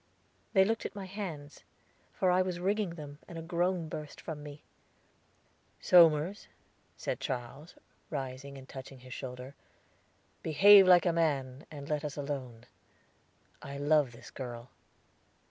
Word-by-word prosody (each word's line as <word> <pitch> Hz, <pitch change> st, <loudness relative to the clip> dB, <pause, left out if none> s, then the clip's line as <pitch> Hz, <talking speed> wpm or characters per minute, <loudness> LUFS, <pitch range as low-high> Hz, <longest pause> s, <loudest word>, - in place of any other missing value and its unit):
They 190 Hz, -2 st, +6 dB
looked 225 Hz, +2 st, -1 dB
at -, -, -6 dB
my 200 Hz, -2 st, -6 dB
hands, 180 Hz, -7 st, -7 dB, 0.5 s
for 185 Hz, -2 st, +1 dB
I 180 Hz, +1 st, +4 dB
was 185 Hz, -1 st, -2 dB
wringing 195 Hz, -1 st, 0 dB
them, 145 Hz, -2 st, -9 dB
and 170 Hz, -, -8 dB
a 165 Hz, -, -6 dB
groan 175 Hz, 0 st, 0 dB
burst 150 Hz, -1 st, -7 dB
from 155 Hz, -3 st, -6 dB
me. 145 Hz, 0 st, -10 dB, 1.2 s
"Somers," 170 Hz, +2 st, +5 dB, 0.5 s
said -, -, -3 dB
Charles, 130 Hz, +7 st, -5 dB, 0.3 s
rising 135 Hz, -1 st, -5 dB
and 130 Hz, 0 st, -12 dB
touching 135 Hz, -1 st, -10 dB
his 130 Hz, 0 st, -10 dB
shoulder, 125 Hz, 0 st, -7 dB, 0.9 s
"behave 195 Hz, +4 st, +7 dB
like 180 Hz, -1 st, +7 dB
a 175 Hz, -, +3 dB
man, 140 Hz, -5 st, -1 dB
and 145 Hz, -2 st, -9 dB
let 150 Hz, -1 st, -1 dB
us 150 Hz, -1 st, -5 dB
alone; 130 Hz, -5 st, -5 dB, 1.0 s
I 140 Hz, 0 st, -7 dB
love 145 Hz, -2 st, +3 dB
this 115 Hz, -, -13 dB
girl." 120 Hz, -2 st, -7 dB
150 Hz, 140 wpm, -31 LUFS, 135-175 Hz, 1.2 s, behave